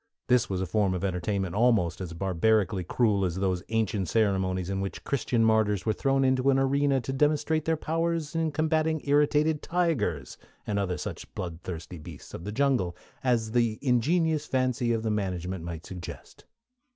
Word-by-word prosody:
This 125 -2 +3
was 95 -1 -1
a - - 0
form 95 0 +1
of 90 - -4
entertainment 95 0 -1
almost 105 -6 +2
as 90 -2 -5
barbarically 95 +2 +1
cruel 105 +1 +1
as 90 -3 -1
those 95 -2 0
ancient 110 -4 0
ceremonies 95 -4 +1
in 95 0 -2
which 95 - -5
Christian 120 -4 +1
martyrs 110 -3 +2
were 110 - +2
thrown 135 +3 +1
into 130 +1 +2
an 135 - +4
arena 135 0 +2
to 125 +3 -4
demonstrate 150 +2 +1
their 160 0 +1
powers 165 -1 -1
in 165 -1 0
combatting 155 0 +1
irritated 150 +1 +3
tigers, 125 - -1 0.3
and 100 -1 -1 0.2
such - - -5
other - - -35
blood 85 -2 -5
thirsty 85 -1 -7
beasts 75 - -11
of 85 - -7
the 105 - -3
jungle 110 -9 +1 0.3
as 115 -4 +1
the 115 -2 +1
ingenious 150 +5 +2
fancy 125 -2 0
of 115 -1 0
the 110 - 0
management 95 -3 -2
might 85 -1 -6
suggest. 90 -2 -9
110 Hz, 175 wpm, -28 LUFS, 95-140 Hz, 0.3 s, an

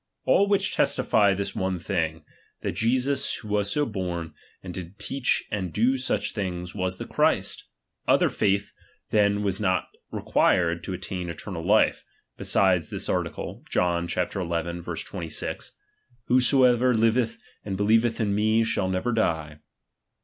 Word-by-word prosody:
All 200 - +4
which 200 -1 +1
testify 100 -3 +3
this 100 +1 -3
one 95 -1 -1
thing; 80 -4 -2 0.4
that - - -1
Jesus 130 +4 +1
who 105 - -9
was 105 -1 +1
so 145 +6 +1
born, 90 - -4 0.3
and 90 -2 -7
did 90 +2 -8
teach 135 -2 0
and 95 -4 -2
do 120 +8 +2
siich 130 0 -1
things, 90 -3 -4
was 95 -1 -2
the - - -6
Christ. - - 0 0.4
Other - - +4
faith 100 -1 0 0.4
then 105 -1 +3
was 95 -2 0
not 95 -4 0 0.2
required 85 -1 +1
to 95 - -4
attain 90 -1 -5
eternal 85 +1 -6
life, 105 +5 +3 0.3
besides 90 -5 +2
this - - -4
article, - - -3
John 85 -1 +1
xi. 90 - 0
26: 85 -2 -4 0.5
Whosoever 125 0 +4
liveth 115 +1 +2 0.3
and 95 -2 -4
hclieveth 110 +3 +2
in 105 -3 +1
me, 110 +2 +3
shall 105 -4 0
never 95 +6 -1
die. 80 -9 -1
100 Hz, 140 wpm, -26 LUFS, 90-115 Hz, 0.5 s, All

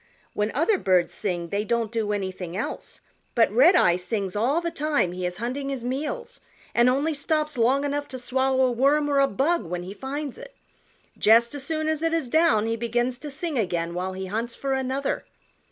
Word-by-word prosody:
When 210 +1 0
other 350 +7 +2
birds 185 -2 +2
sing 175 -4 -3
they 200 +3 -1
don't 230 0 -1
do 220 -3 -1
anything 190 -3 -4
else, 220 - -5 0.3
but 230 -4 +4
Redeye 255 - +5
sings 195 0 -3
all 250 +10 +2
the 340 0 -3
time 295 - 0
he 180 0 -3
is 180 0 -6
hunting 255 +5 -3
his 270 -4 -4
meals 310 - -4 0.3
and 240 +1 +5
only 285 +5 +1
stops 300 +1 -1
long 255 +4 +2
enough 290 0 -2
to 260 - -6
swallow 260 +1 +1
a 255 - +1
worm 280 +5 +2
or 280 - +3
a 275 - +5
bug 295 - +1
when 175 +1 -4
he 185 +2 -7
finds 275 +3 -5
it. - - -12 0.6
Just 230 +3 +5
as 285 -2 -4
soon 310 +1 -2
as 315 -1 0
it 330 0 +1
is 320 -7 0
down 315 -8 +3
he 225 0 0
begins 240 +2 -1
to 295 - -7
sing 300 -1 -3
again 170 -4 -1
while 185 +2 -3
he 190 0 -5
hunts 225 +5 -3
for 275 -1 -2
another. 265 +1 -1
250 Hz, 200 wpm, -25 LUFS, 210-290 Hz, 0.6 s, Redeye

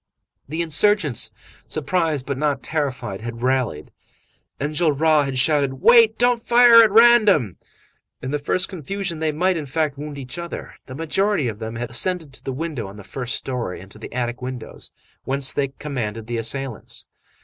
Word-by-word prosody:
The 160 +3 -1
insurgents, 160 - +2 0.4
surprised 155 -2 -1
but 140 - -2
not 145 -2 0
terrified, 130 -10 -3
had 115 +1 -7
rallied. 125 - -1 0.7
Enjolras 155 0 +2
had 135 -1 -3
shouted: 140 0 +2
"Wait! 225 - +6
Don't 245 -1 +3
fire 235 -1 +7
at 225 - +5
random!" 210 - +5 0.6
In 130 - -5
the 150 - -1
first 180 +6 0
confusion, 185 -1 -5
they 160 -1 0
might, 180 +4 +1
in 150 -3 -5
fact, 145 0 -1
wound 150 -1 -6
each 135 +3 -7
other. 170 0 -7
The 130 - -8
majority 165 +1 0
of 110 -2 -5
them 110 0 -5
had 120 0 -5
ascended 160 +4 -2
to - - -11
the 135 - -3
window 140 -5 -4
on 100 +2 -11
the 105 - -10
first 125 +4 -3
story 125 -8 -3
and 95 +1 -13
to 105 - -13
the - - -9
attic 120 0 -3
windows, 125 -2 -7 0.3
whence 135 0 -2
they 140 -1 0
commanded 120 -6 -5
the 120 +1 -3
assailants. 120 +2 -4
145 Hz, 170 wpm, -22 LUFS, 125-170 Hz, 0.7 s, fire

